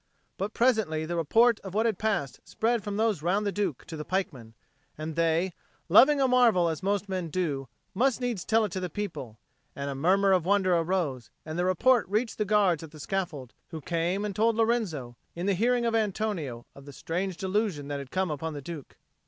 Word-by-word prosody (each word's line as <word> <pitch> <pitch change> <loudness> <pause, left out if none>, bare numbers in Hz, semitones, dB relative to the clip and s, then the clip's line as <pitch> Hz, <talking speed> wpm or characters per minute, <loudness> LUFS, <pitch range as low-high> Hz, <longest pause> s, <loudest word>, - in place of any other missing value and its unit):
But 200 +3 -4
presently 215 -11 +2
the 170 +2 -3
report 225 +8 +3
of 190 -1 -9
what 220 +2 +2
had 220 -5 0
passed 205 -12 -1
spread 230 -1 -1
from 205 0 -4
those 215 -7 +1
round 190 +6 +1
the 200 - 0
Duke 195 -9 -2
to 160 - -8
the 150 - -5
pikemen, 140 -11 -3 0.4
and 155 0 -5
they, 165 +2 +1 0.4
loving 275 - +7
a 270 - +4
marvel 235 -9 +4
as 160 -2 -4
most 200 +1 -1
men 185 -3 -3
do, 145 -6 -2 0.3
must 255 +5 +2
needs 240 -8 -2
tell 225 0 +2
it 205 - -5
to 185 - -3
the 180 -1 -3
people, 155 - -5 0.4
and 140 0 -4
a - - -3
murmur 190 +8 +3
of 185 -3 +3
wonder 185 -1 +3
arose, 165 -8 -1 0.2
and 155 +2 -4
the 175 - +1
report 220 +4 +3
reached 220 +3 -1
the 210 - +1
guards 195 -6 +3
at 160 - -9
the 155 0 -14
scaffold, 155 -7 -4
who 160 - -7
came 175 +6 -1
and 205 -2 -4
told 225 +2 +2
Lorenzo, 205 - -1 0.2
in 175 +2 -4
the 200 - +2
hearing 240 +5 +1
of 230 - +1
Antonio, 200 - -2
of 140 - -14
the 140 - -10
strange 180 +5 -3
delusion 190 -6 -1
that 145 -1 -3
had 140 -2 -8
come 185 0 -1
upon 155 +1 -4
the 145 - -6
Duke. 155 -3 -8
185 Hz, 210 wpm, -28 LUFS, 160-215 Hz, 0.4 s, loving